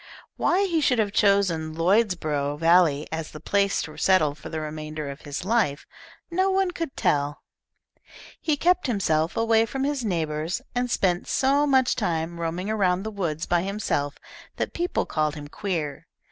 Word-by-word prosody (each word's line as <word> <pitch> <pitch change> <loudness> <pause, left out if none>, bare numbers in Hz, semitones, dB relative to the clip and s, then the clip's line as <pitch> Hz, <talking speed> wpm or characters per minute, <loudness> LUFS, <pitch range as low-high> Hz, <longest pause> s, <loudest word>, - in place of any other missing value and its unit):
Why 385 +3 +2
he 335 -4 +1
should 250 -4 +3
have 210 -2 +1
chosen 190 -7 +2
Lloydsborough 165 -6 +1
Valley 165 -3 +4
as 160 -1 -4
the 150 - -10
place 200 +5 +1
to - - -8
settle 160 -7 +3
for 150 - -10
the 160 - -3
remainder 155 -1 -5
of 140 - -11
his 145 +4 -5
life, 210 -10 +1 0.5
no 375 +3 +2
one 380 -1 +1
could 330 -5 -5
tell. 145 0 0 1.0
He 305 -2 +1
kept 360 +4 +3
kimself 175 - 0
away 225 0 +3
from 270 +4 -3
his 280 -2 -1
neighbours, 160 -4 -1
and 245 0 -1
spent 180 -6 +1
so 280 +2 +2
much 265 -2 +3
time 170 -4 -2
roaming 170 +3 -3
around 190 -4 +1
the 220 - -4
woods 170 -6 -2
by 175 -1 +2
himself 185 -7 -2 0.4
that - - -3
people 350 +1 -1
called 155 -1 -1
him 145 -1 -8
queer. 155 -5 -4
180 Hz, 165 wpm, -25 LUFS, 155-230 Hz, 1.0 s, Valley